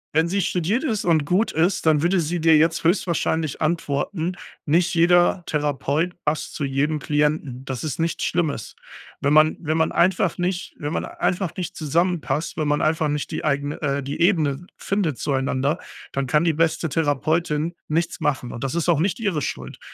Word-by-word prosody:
Wenn 160 +1 +4
sie 195 +3 0
studiert 185 - 0
ist 220 -9 -1
und 160 -4 +3
gut 190 +9 +1
ist, 170 +1 +1
dann 150 -1 +4
würde 180 +2 +3
sie 170 +2 -1
dir 160 0 +5
jetzt 160 +2 +3
höchstwahrscheinlich 165 -3 0
antworten: 165 +2 -1 0.3
„Nicht 165 +4 +2
jeder 175 +1 +4
Therapeut 150 +3 0
passt 150 +1 -2
zu - - -4
jedem 145 +3 0
Klienten.“ 145 -3 -1
Das 130 -3 -4
ist 150 -3 -3
nichts 165 0 -1
Schlimmes. 160 -9 -1 0.5
Wenn 140 +1 +2
man 155 +1 +5
wenn 155 -2 -1
man 160 0 +2
einfach 185 -2 +2
nicht 180 0 -2
wenn 145 0 -4
man - - -1
einfach 180 -2 -2
nicht 180 -3 -4
zusammenpasst, 165 0 -1
wenn 155 -2 0
man 145 0 +1
einfach 155 0 +1
nicht 150 0 -2
die - - -4
eigene, 145 0 -1
äh 140 -2 -1
die 140 +5 -5
Ebene 170 -3 +2
findet 190 -9 -1
zueinander, 140 +3 0 0.3
dann 135 -1 -2
kann 150 +5 +3
die 165 -2 +2
beste 165 +1 +1
Therapeutin 155 +2 0
nichts 160 +2 -1
machen 130 -4 -1
und 115 - -7
das 135 +3 -2
ist 170 0 0
auch 160 -4 +4
nicht 185 +6 0
ihre 195 -9 -1
Schuld. 65 - -5
160 Hz, 185 wpm, -23 LUFS, 145-175 Hz, 0.5 s, dir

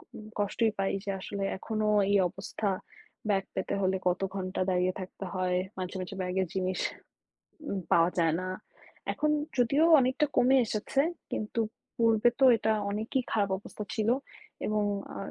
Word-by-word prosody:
উম 215 - -9
কষ্টই 215 +2 +1
পাই। 195 0 +1
যে 200 - -5
আসলে 200 +1 -4
এখনো 215 +1 -2 0.2
এই 200 - +5
অবস্থা। 205 +2 -3 0.6
ব্যাগ 195 -1 +2
পেতে - - -2
হলে 190 0 +2
কত 180 +1 +1
ঘন্টা 185 -1 -2
দাঁড়িয়ে 180 0 +2
থাকতে 190 +1 -7
হয়, 180 -1 +1 0.2
মাঝে, 185 +1 -4
মাঝে 185 +2 -6
ব্যাগের 185 0 0
জিনিস 185 -1 -1 0.9
উম 195 - -1
পাওয়া 170 +1 +5
যায় 165 -2 +3
না। 185 - -3 0.6
এখন 305 0 0 0.3
যদিও 275 +6 +4 0.2
অনেকটা 260 +4 +2
কমে 260 +2 +6
এসেছে। 220 +6 0 0.3
কিন্তু 215 +2 -2 0.4
পূর্বে 230 0 +4
তো 265 - +6
এটা 220 0 +1 0.2
অনেকই 220 +6 -1
খারাপ 205 -3 +2
অবস্থা 210 - -8
ছিল। 220 +1 +1 0.6
এবং 210 0 +1 0.3
আ - - -5
205 Hz, 155 wpm, -30 LUFS, 185-225 Hz, 0.9 s, কমে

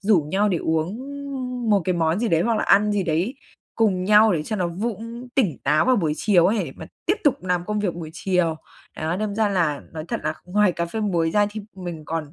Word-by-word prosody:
rủ 200 -4 +4
nhau 205 +2 +2
để 175 -4 +1
uống 160 +3 0 0.8
một 200 -2 +4
cái 185 - +1
món 165 +1 +1
gì 235 -1 0
đấy, 165 -2 +3
hoặc 230 -1 +1
là - - 0
ăn 210 +1 +4
gì 200 -2 +1
đấy 175 - 0 0.4
cùng 190 -5 +1
nhau 210 +1 +6
để 155 -3 0
cho 215 +7 -3
nó 180 -2 0
vũng 230 +6 -5
tỉnh 200 - +1
táo 150 +3 +3
vào 255 -1 +4
buổi 160 -6 +1
chiều 180 -2 +4
ấy, 215 +3 +2
để - - -8
mà - - -9 0.2
tiếp 385 - +3
tục 280 -10 +2
làm 180 -1 0
công 210 +1 -2
việc 190 -5 -1
buổi 165 -2 -7
chiều. 175 -3 0 0.4
Đó, 160 +3 -2
đâm 210 0 -2
ra 220 -1 +2
là 165 -7 0
nói 155 -1 -6
thật - - -2
là 155 +1 0
ngoài 200 +1 +2
cà 170 0 -2
phê 220 +6 -4
muối 170 -6 +1
ra 205 +2 +3
thì 215 +1 -6 0.2
mình 175 -4 -6
còn, 155 -2 -4
185 Hz, 245 wpm, -23 LUFS, 165-210 Hz, 0.8 s, nhau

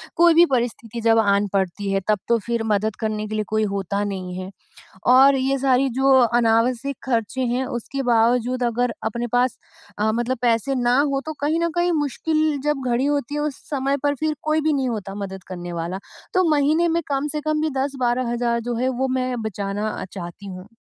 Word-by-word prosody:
कोई 340 0 +6
भी 340 +2 +7
परिस्थिति 235 -1 -2
जब 225 0 +4
आन 200 -1 +2
पड़ती 195 +1 -1
है 195 - +2
तब 210 -2 +2
तो 235 - +3
फिर 235 -1 -1
मदद 210 +1 0
करने 215 -1 -2
के 215 - -4
लिए 215 - 0
कोई 215 0 0
होता 200 +1 -2
नहीं 185 -3 -4
है। 185 +1 -6 0.6
और 270 +1 +7
ये 270 +1 +1
सारी 265 0 +2
जो 270 0 +4
अनावश्यक 240 +3 +2
ख़र्चे 240 0 -1
हैं 260 +1 0
उसके 270 +2 -4
बावजूद 245 +1 +2
अगर 240 0 0
अपने 235 +2 -2
पास 250 0 +1 0.4
अ, 220 +1 +2
मतलब 240 +3 -1
पैसे 240 +3 +1
ना 245 +1 +2
हो 275 -1 +1
तो 315 - -4
कहीं 310 +3 +1
न 335 0 +1
कहीं 350 0 +2
मुश्किल 310 +1 0
जब 295 -2 0
घड़ी 245 +3 +1
होती 290 -1 -1
है 295 - -1
उस 300 -2 -2
समय 275 -1 0
पर 285 0 +2
फिर 310 +1 -1
कोई 310 0 +1
भी 310 0 +1
नहीं 265 -3 0
होता 200 -3 -5
मदद 190 -2 -6
करने 175 -1 -6
वाला। 170 +3 -4 0.3
तो 370 0 +3
महीने 305 +3 +3
में 335 +1 +1
कम 280 +1 -1
से 300 -1 -3
कम 310 0 0
भी 315 - +1
10-12,000 245 -3 0
जो 240 - -1
है 255 +3 0
वो 260 +1 -1
मैं 255 -2 -2
बचाना 205 0 -3
अ, 190 - -5
चाहती 180 +1 -8
हूँ। 185 +1 -8
245 Hz, 205 wpm, -22 LUFS, 215-275 Hz, 0.6 s, भी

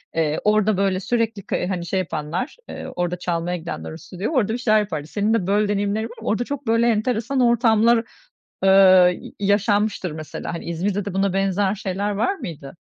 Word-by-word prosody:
eee, 155 -2 +1
orada 210 -1 +3
böyle, 195 -1 +1
sürekli 225 0 -1
ka - - -1
hani 180 -3 -3
şey 190 +3 -1
yapanlar, 165 - -4
eee, - - -7
orada 175 0 -1
çalmaya 175 0 -2
gidenler, 170 0 -6
o 160 - -8
stüdyoya, 190 - -5
orada 220 -2 +1
bir - - -1
şeyler 215 -3 +3
yapardı. 160 -8 -3
Senin 210 +5 0
de 205 -6 0
böyle 205 +2 +3
deneyimlerin 205 +1 0
var - - -7
mı? - - -8
Orada 220 +3 +1
çok 280 0 -6
böyle 230 +1 +3
enteresan 235 +3 0
ortamlar, 235 -1 +4 0.6
eee, 185 -2 +6
y - - -10
yaşanmıştır 205 -2 +1
mesela. 155 +1 -6
Hani 170 - -6
İzmir'de 190 +4 -2
de 200 - -4
buna 195 0 +1
benzer 195 +1 +1
şeyler 200 0 -2
var 225 - 0
mıydı? 165 - -8
200 Hz, 190 wpm, -22 LUFS, 180-220 Hz, 0.6 s, eee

